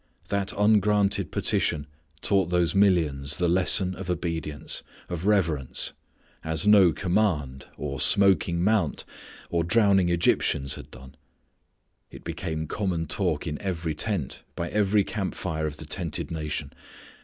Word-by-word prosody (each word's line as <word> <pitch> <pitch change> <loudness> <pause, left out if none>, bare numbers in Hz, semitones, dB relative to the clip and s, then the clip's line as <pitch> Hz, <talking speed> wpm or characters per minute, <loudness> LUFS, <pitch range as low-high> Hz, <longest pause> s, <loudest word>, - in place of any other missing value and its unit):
That 100 -1 -1
ungranted 105 -3 +3
petition 75 -1 0 0.4
taught 95 -4 +2
those 90 -3 +1
millions 80 -8 +2
the 90 - +1
lesson 95 +2 +3
of 95 0 -8
obedience, 85 -4 -3 0.3
of 90 +2 -4
reverence, 85 -11 0 0.5
as 80 +3 0
no 100 -4 +6
command, 80 -9 -1
or 70 -1 -4
smoking 85 +1 +4
mount, 100 -6 +1 0.5
or 85 -1 +1
drowning 95 -1 +3
Egyptians 70 -5 +1
had - - -9
done. 65 +2 -13 1.0
It - - -13
became 80 -3 -4
common 90 -2 -2
talk - - -1
in 75 - -4
every 85 -5 -3
tent, 85 - -3
by 85 - -3
every 105 0 +2
camp 95 -1 -4
fire 80 -3 -3
of 75 0 -6
the - - -9
tented - - -4
nation. 75 -2 -4
85 Hz, 130 wpm, -26 LUFS, 80-100 Hz, 1.0 s, no